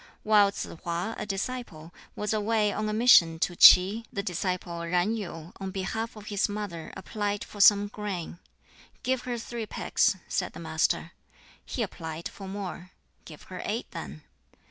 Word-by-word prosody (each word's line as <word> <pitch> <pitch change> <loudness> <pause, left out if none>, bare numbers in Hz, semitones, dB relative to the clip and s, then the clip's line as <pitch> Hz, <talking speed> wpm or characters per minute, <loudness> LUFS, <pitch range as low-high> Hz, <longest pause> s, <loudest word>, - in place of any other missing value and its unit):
While 210 -2 +5
Tsz - - -4 0.2
hwa, 175 +5 -2
a 210 - -5
disciple, 195 -6 -5 0.2
was 210 +1 -2
away 215 -1 +1
on 215 0 -2
a - - -1
mission 210 -8 +6
to 180 - +1
Ts'i, 195 +7 +8
the 200 - -3
disciple 180 -2 -3
Yen 180 +6 +1
Yu, 170 -5 -7
on 195 -1 -4
behalf 205 +4 -3
of 210 -1 -11
his 205 0 0
mother, 205 -6 -5
applied 205 +1 -3
for 205 - -6
some 205 0 +7
grain. 200 -5 -5 0.6
"Give 255 0 0
her 245 -1 -2
three 230 -1 -5
pecks," - - +1
said - - -2
the - - -9
Master. - - 0 0.5
He 245 - -3
applied 165 -4 -6
for 195 - -10
more. 190 -2 -6 0.4
"Give - - -12
her - - -8
eight, - - -3
then." 75 +3 -8
200 Hz, 165 wpm, -28 LUFS, 180-215 Hz, 0.6 s, Ts'i